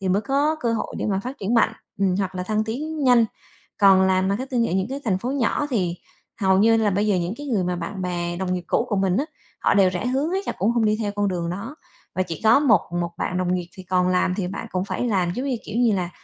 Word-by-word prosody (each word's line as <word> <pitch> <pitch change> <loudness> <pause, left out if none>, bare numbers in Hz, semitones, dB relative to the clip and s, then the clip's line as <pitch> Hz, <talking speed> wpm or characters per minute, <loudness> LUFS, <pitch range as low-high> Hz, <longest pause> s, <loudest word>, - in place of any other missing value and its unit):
thì 190 - -2
mới 200 +3 +2
có 285 +3 +1
cơ 235 -2 0
hội 220 - -3
để - - -2
mà 195 -2 0
phát 255 +5 -7
triển 210 +4 -1
mạnh, 225 -1 +4 0.3
ừm, 190 -2 +2
hoặc 190 -2 -2
là 180 - -3
thăng 215 +3 0
tiến 295 +6 -3
nhanh. 245 -2 +6 0.5
Còn 195 -2 +6
làm 190 0 +2
marketing 240 +2 0
ở - - -3
những 190 0 +1
cái 275 +1 -4
thành 190 -5 +1
phố 245 +6 -3
nhỏ 280 +2 0
thì 180 -7 0 0.4
hầu 190 -1 +3
như 225 +2 +5
là 215 -2 +2
bây 205 +3 +1
giờ 205 - +2
những 175 +3 -2
cái 290 - -7
người 215 -8 0
mà 180 0 -1
bạn 180 +3 -5
bè 175 -1 -2
đồng 185 0 -1
nghiệp 180 - -4
cũ 235 - +1
của 205 - 0
mình 190 -1 +1
á, 280 - +1 0.4
họ - - +3
đều 195 -2 +5
rẽ 185 +6 -3
hướng 275 +6 0
hết 385 +1 -2
là - - -1
cũng 200 +5 +2
hông 235 -2 +1
đi 215 0 +2
theo 205 -2 -2
con 205 -1 +1
đường 170 -2 -2
đó, 210 - -6 0.4
và 185 - +1
chỉ 170 -3 -6
có 225 +6 +6
một 275 -7 +5 0.2
một 170 0 -2
bạn 180 - -2
đồng 180 0 0
nghiệp 175 -2 -3
thì 190 - -8
còn 180 0 +1
làm, 180 0 +2
thì 185 -4 -2
bạn 200 +4 -6
cũng 185 0 -1
phải 225 - -3
làm 185 -5 +1
giống 255 +3 -3
như, 260 -3 0
kiểu, 210 - -6
như 240 -3 +4
là 180 -2 -2
200 Hz, 285 wpm, -23 LUFS, 185-235 Hz, 0.5 s, nhanh